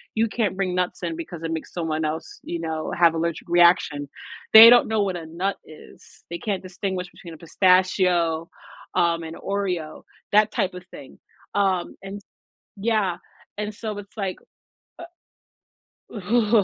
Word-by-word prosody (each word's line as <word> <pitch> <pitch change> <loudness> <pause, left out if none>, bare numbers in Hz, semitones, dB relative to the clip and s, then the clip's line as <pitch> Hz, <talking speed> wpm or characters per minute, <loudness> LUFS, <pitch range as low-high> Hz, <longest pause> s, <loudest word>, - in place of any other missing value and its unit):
you 225 +1 +2
can't 210 -4 -2
bring 185 -2 -1
nuts 180 0 -2
in 165 -1 -2
because 170 0 -8
it 165 - -3
makes 160 - -6
someone 160 -2 -2
else, 160 +1 -5
you 170 - -4
know, 160 -1 -4
have 170 -1 +5
allergic 165 0 -3
reaction. 170 -5 +3 0.4
They 225 +1 +12
don't 245 0 +6
know 215 -2 +1
what 190 -2 -2
a 165 - -8
nut 180 +5 -2
is, 155 - -16
they 170 - -4
can't 200 -2 -3
distinguish 185 -1 -4
between 170 -2 -12
a - - -11
pistachio, 180 -2 +2 0.5
um, 170 -1 +2
an 160 0 -7
Oreo, 185 -6 -3 0.3
that 210 0 +5
type 185 - -1
of 180 0 -9
thing, 135 - -12 0.4
um, 190 -3 0
and 195 +1 -7 0.6
yeah, 200 -4 0 0.4
and 210 0 -3
so 215 0 -6
it's 205 +2 -13
like, 195 -3 -3 1.8
uh 215 +1 +2
180 Hz, 155 wpm, -23 LUFS, 165-200 Hz, 1.8 s, They